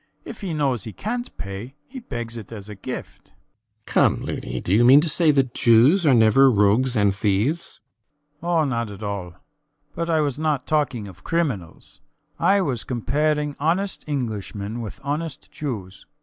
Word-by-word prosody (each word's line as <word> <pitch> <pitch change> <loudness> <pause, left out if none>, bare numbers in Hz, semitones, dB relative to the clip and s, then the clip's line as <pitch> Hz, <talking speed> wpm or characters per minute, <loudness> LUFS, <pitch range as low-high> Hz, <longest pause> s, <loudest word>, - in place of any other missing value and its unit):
If 230 - -9
he 190 -4 -3
knows 135 -8 0
he 110 - -7
cant 240 +4 -4
pay, 100 +7 -7
he 265 - -8
begs 120 - -6
it 115 -2 -9
as 105 -2 -8
a - - -6
gift. 100 - -8
RIDGEON. 110 0 -38
Come, - - +3
Loony! 60 +1 -4
do 90 - -2
you 115 +4 +5
mean 130 +4 +8
to 170 - -1
say 160 +2 +2
that 135 -4 +2
Jews 130 - +5
are 140 - +6
never 115 +4 +6
rogues 115 +4 +3
and 100 -2 +3
thieves? 105 - 0 0.6
SCHUTZMACHER. 170 +2 -3
Oh, 165 -3 +3
not 115 -5 -2
at 100 +1 -9
all. 100 -4 -4 0.6
But 170 0 -3
I 160 -2 +3
was 145 -2 -1
not 150 -4 0
talking 140 -8 0
of 95 -1 -14
criminals. 130 - -3 0.4
I 200 0 +4
was 130 - -1
comparing 150 +4 -1
honest 180 +7 0
Englishmen 110 -5 -4
with 110 - -7
honest 150 +1 -4
Jews. 100 -10 -6
125 Hz, 175 wpm, -23 LUFS, 105-155 Hz, 0.6 s, mean